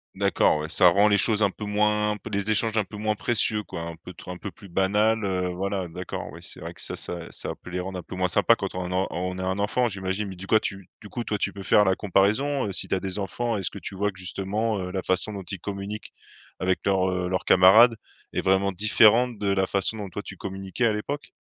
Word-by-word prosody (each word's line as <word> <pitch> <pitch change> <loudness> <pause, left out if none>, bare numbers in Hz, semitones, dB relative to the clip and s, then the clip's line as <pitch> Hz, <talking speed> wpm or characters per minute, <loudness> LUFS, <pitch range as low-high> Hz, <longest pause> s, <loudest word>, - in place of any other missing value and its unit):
D'accord, - - +2
ouais, 75 +1 -4
ça 90 +2 +5
rend 100 +4 +5
les 100 - +4
choses 105 +2 +3
un 100 - +3
peu 105 - -7
moins 105 0 +1
peu - - -10
les 100 +1 -1
échanges 110 +1 +2
un 110 - +3
peu 105 - -10
moins 105 +1 0
précieux 110 -1 +1
quoi, 85 - -7
un 85 0 -6
peu 90 +3 -11
trop 90 - -9
un 90 - -6
peu 100 - -6
plus 100 - -14
banals 105 +5 +2
heu, 90 -2 -1
voilà. 95 +1 -2
D'accord, 90 +2 -6
oui - - -10
c'est - - -11
vrai - - -7
que - - -11
ça - - -3
ça, 85 -1 -5
ça - - -3
peut - - -10
les 90 0 -3
rendre 95 0 -4
un - - -9
peu - - -8
moins 90 0 +1
sympa 105 +5 +4
quand 100 -3 -5
on 90 -1 -4
a - - -1
en 95 +1 +1
on 90 +2 -3
a 95 - -4
un 95 +1 -1
enfant 120 +5 +1
j'imagine. 95 +1 -3
Mais 95 - -8
du 95 +2 -9
quoi 110 - +5
tu 95 -3 -5
du 105 - -11
coup, 120 - -4
toi 105 - -2
tu - - -2
peux 100 - -8
faire 105 +2 +4
la 95 - +3
comparaison, 110 +9 +1
heu, - - -3
si 90 - -2
tu - - 0
as - - -1
des 95 +1 -4
enfants. 115 +4 -2
Est-ce 95 - -1
que - - -10
tu - - -7
vois 105 +2 0
que 90 - -19
justement, 100 +4 -1
heu, 90 -1 -4
la 95 -1 -3
façon 95 +3 +1
dont 100 -1 -6
ils 95 - -5
communiquent 100 +3 -6 0.5
avec 95 0 +1
leurs, 95 -2 +2
heu, 90 0 -1
leurs 95 -1 -1
camarades 110 +6 +7 0.4
est - - 0
vraiment 95 +1 +2
différente 110 +4 +4
de 100 -1 -1
la 95 -1 +1
façon 100 +3 0
dont 100 -2 -5
toi 105 +4 -6
tu 95 - -9
communiquais 95 +5 -3
à 110 - +3
l'époque? 140 +8 -4
100 Hz, 270 wpm, -25 LUFS, 95-105 Hz, 0.5 s, camarades